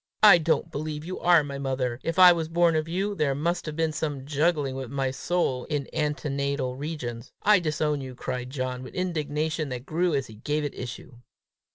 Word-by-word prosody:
I 200 -5 +9
don't 165 +1 0
believe 155 0 -4
you 185 +2 -5
are 175 -3 +5
my 140 -1 -6
mother. 130 -3 -2
If 165 +2 -3
I 180 -1 +10
was 165 -2 -1
born 170 0 +3
of 155 0 0
you, 195 +5 -1
there 150 -7 0
must 170 +4 -1
have 155 - -4
been 160 0 +1
some 145 -3 -3
juggling 145 -1 +1
with 130 -2 -5
my 135 0 -1
soul 135 -2 -1
in 145 -3 -2
antenatal 140 -3 -1
regions! 130 -6 -5
I 210 -1 +6
disown 150 -3 -1
you!" 130 -1 -7
cried 125 0 -4
John 130 -2 -3
with 130 - -10
indignation 155 -3 -1
that 125 0 -5
grew 170 +1 +1
as 135 -2 0
he 110 - -12
gave 150 +8 -2
it 145 - -3
issue. 120 0 -8
150 Hz, 200 wpm, -26 LUFS, 135-165 Hz, -, I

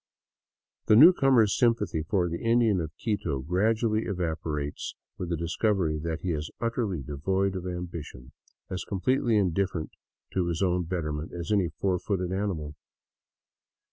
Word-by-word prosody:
The 110 - +6
newcomer's 135 - +6
sympathy 105 -9 +1
for 90 +3 0
the 85 0 -4
Indian 115 -5 +3
of 80 -1 -5
Quito 90 - -1
gradually 110 - +1
evapo 85 -5 -2
rates 75 0 -4 0.2
with 90 - -4
the 85 - -1
discovery 85 -1 0
that 80 +1 -3
he 90 - -1
is 75 -1 -3
utterly 115 - -1
devoid 95 +9 -1
of 90 -1 -4
ambition, 85 -8 -6 0.4
as 90 -2 -4
com 100 - -4
pletely 120 -3 +2
indifferent 95 -3 0 0.4
to 90 -2 +1
his 85 +2 -1
own 90 -1 +1
betterment 80 -2 -3
as 85 +3 -5
any 100 -5 +2
four 95 -2 +1
footed 90 -2 -2
animal. 95 -7 -2
90 Hz, 145 wpm, -28 LUFS, 80-105 Hz, 0.4 s, The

